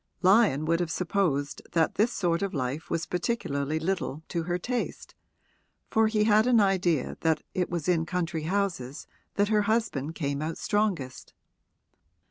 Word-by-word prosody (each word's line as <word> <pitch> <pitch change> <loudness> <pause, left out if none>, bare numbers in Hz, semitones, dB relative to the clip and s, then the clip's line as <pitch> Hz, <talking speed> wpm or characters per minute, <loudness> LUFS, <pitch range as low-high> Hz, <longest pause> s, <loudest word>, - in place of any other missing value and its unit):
Lyon 190 - +4
would 165 +1 +2
have 175 -2 -1
supposed 160 -5 -1
that 165 -2 +2
this 225 +4 +2
sort 175 -5 0
of 195 -3 -2
life 135 +3 -3
was 165 - -1
particularly 155 -7 -1
little 160 -3 -2
to 170 - -1
her 175 +2 -1
taste, 245 +6 -4 0.8
for 220 0 +4
he 215 -1 +2
had 215 +1 +4
an 245 -2 +5
idea 185 -7 +1
that 160 -2 +1
it 180 -1 -1
was 170 -3 -3
in 165 -2 +2
country 165 -3 -2
houses 175 -9 -2 0.3
that 205 0 +2
her 215 -1 +3
husband 165 - 0
came 140 -3 -2
out 160 +1 -3
strongest. 195 -12 -2
175 Hz, 155 wpm, -28 LUFS, 155-200 Hz, 0.8 s, an